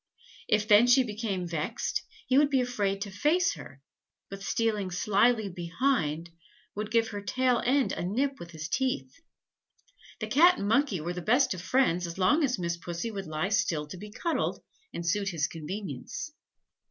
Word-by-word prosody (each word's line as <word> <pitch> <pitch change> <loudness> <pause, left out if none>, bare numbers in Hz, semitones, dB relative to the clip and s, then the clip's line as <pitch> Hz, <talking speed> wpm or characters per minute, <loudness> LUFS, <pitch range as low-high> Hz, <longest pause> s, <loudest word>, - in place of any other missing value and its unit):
If 210 0 +2
then 215 +2 +7
she 255 +2 +6
became 210 -5 -3
vexed, 170 - -2 0.2
he 255 - +1
would 285 +1 +5
be 270 -2 +2
afraid 205 -6 -1
to 205 -2 -4
face 300 - +2
her, 140 -3 -12 0.5
but 195 0 -7
stealing 210 -2 0
slily 210 +4 +2
behind, 170 - -1 0.4
would 210 +1 -4
give 225 0 +2
her 205 -1 -5
tail 250 +3 +1
end 265 +2 +2
a - - -3
nip 265 +9 -1
with 170 - -9
his 160 -1 -6
teeth. 250 - -1 1.1
The - - -2
Cat 345 +6 +5
and 200 - -3
Monkey 225 - +2
were 175 +3 -3
the 180 - -5
best 245 - +3
of 180 - -7
friends 180 -5 +1
as 170 - -7
long 255 - +3
as 255 -3 +1
Miss 170 -1 -2
Pussy 175 +6 -4
would 195 -4 -6
lie 155 +4 -2
still 165 -7 +1
to 185 - -7
be 210 +4 -9
cuddled, 330 +10 -2 0.3
and 170 - -5
suit 195 +3 +1
his 165 -5 0
convenience. 165 - -6
205 Hz, 175 wpm, -28 LUFS, 175-250 Hz, 1.1 s, then